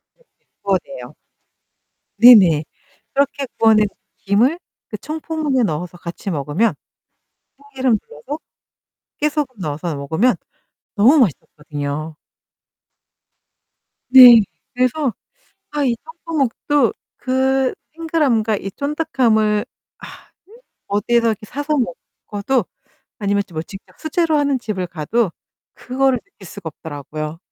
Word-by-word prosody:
네네. - - -30 0.4
구워내요. - - -3 1.0
네네. 200 -10 +8 0.5
그렇게 280 0 0
구워낸 215 -2 +5 0.3
김을 240 - +2 0.3
그 - - -5
청포묵에 310 -4 -2
넣어서 175 -1 -3
같이 170 +4 -7
먹으면 150 +9 0 0.8
참기름 265 -4 0
둘러서 275 - -8 0.8
깨소금 295 -4 -1
넣어서 155 0 -3
먹으면 160 - +1 0.6
너무 240 +9 +5
맛있었거든요. 150 - -2 2.0
네 250 -3 +10 0.3
그래서 255 +1 0 0.6
아 295 -1 -1
이 245 -3 +1
청포묵도 290 - -1 0.2
그 265 0 +1 0.2
탱글함과 295 -10 +1
이 195 - -6
쫀득함을 245 -8 +1 0.3
아 - - -10 0.8
어디에서 230 +3 +1
이렇게 215 -1 -3
사서 290 +5 -2 0.5
먹어도 210 +3 0 0.5
아니면 200 -1 0
뭐 160 -1 -3
직접 195 +4 -13
수제로 320 0 0
하는 285 -2 +1
집을 210 -6 -4
가도 175 +6 -1 0.4
그거를 265 0 0
느낄 400 - -17
수가 170 - -8
없더라고요. 155 +1 -7
235 Hz, 245 characters per minute, -19 LUFS, 185-280 Hz, 2.0 s, 네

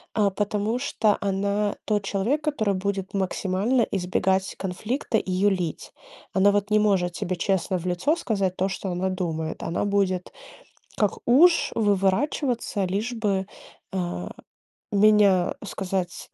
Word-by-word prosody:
А, 205 -3 +3
потому 210 +4 -1
что 220 -6 +1
она 200 +1 0
тот 210 -2 0
человек, 230 +11 0
который 220 -10 0
будет 195 0 -3
максимально 195 +5 0
избегать 190 0 0
конфликта 215 +6 -2
и 185 - -5
юлить. 185 -3 0 0.4
Она 195 +1 +5
вот 205 +1 -1
не 215 - +5
может 190 -4 +2
тебе 180 +1 -3
честно 190 +1 0
в 180 - -7
лицо 180 - +1
сказать 195 - -1
то, 190 - 0
что 195 0 -4
она 180 +1 -1
думает. 165 -4 -3
Она 170 +4 -2
будет 195 -3 0 0.7
как 210 -3 +1
уж 330 +8 +5
выворачиваться, 205 +2 +1
лишь 205 +7 -2
бы, 200 -4 -1 0.4
а 175 - -3 0.6
меня 200 -3 +4
сказать. 190 -3 -4
195 Hz, 130 wpm, -25 LUFS, 185-210 Hz, 0.7 s, Она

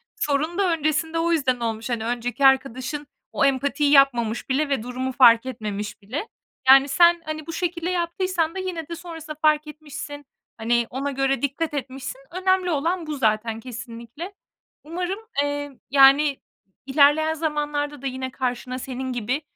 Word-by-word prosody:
sorun 310 -2 -1
da 385 -3 +2
öncesinde 315 +1 0
o 340 +1 +1
yüzden 265 -6 +1
olmuş. 225 0 -3
Hani, 230 -2 -2
önceki 245 +2 -1
arkadaşın 265 +2 +2 0.2
o 275 - +2
empatiyi 280 +2 +1
yapmamış 245 -5 +3
bile 280 +3 +1
ve 270 -6 0
durumu 255 +2 -3
fark 235 -2 +6
etmemiş 210 -4 -5
bile. 255 - -5 0.4
Yani, 270 +1 +8
sen, 345 +4 +5
hani, 310 -1 -5
bu 330 - -5
şekilde 345 0 -2
yaptıysan 345 -1 -1
da - - -3
yine 355 -4 -4
de 335 - -5
sonrasında 325 -3 -8
fark 305 -1 +3
etmişsin, 295 -1 -8 0.3
hani, 235 +1 +1
ona 275 +2 -3
göre 270 -1 0
dikkat 295 +3 -2
etmişsin, 270 0 -5
önemli 370 0 +1
olan 330 +3 -1
bu 305 - -3
zaten 220 -2 0
kesinlikle. 235 - -8 0.5
Umarım, 360 +5 -3 0.2
eee, 290 0 -3 0.2
yani, 275 +1 +6 0.5
ilerleyen 295 +3 +4
zamanlarda 295 -2 -2
da 275 - -3
yine 260 0 -4
karşına 255 0 -3
senin 260 0 -5
gibi, 245 +4 -2
280 Hz, 155 wpm, -23 LUFS, 255-320 Hz, 0.5 s, Yani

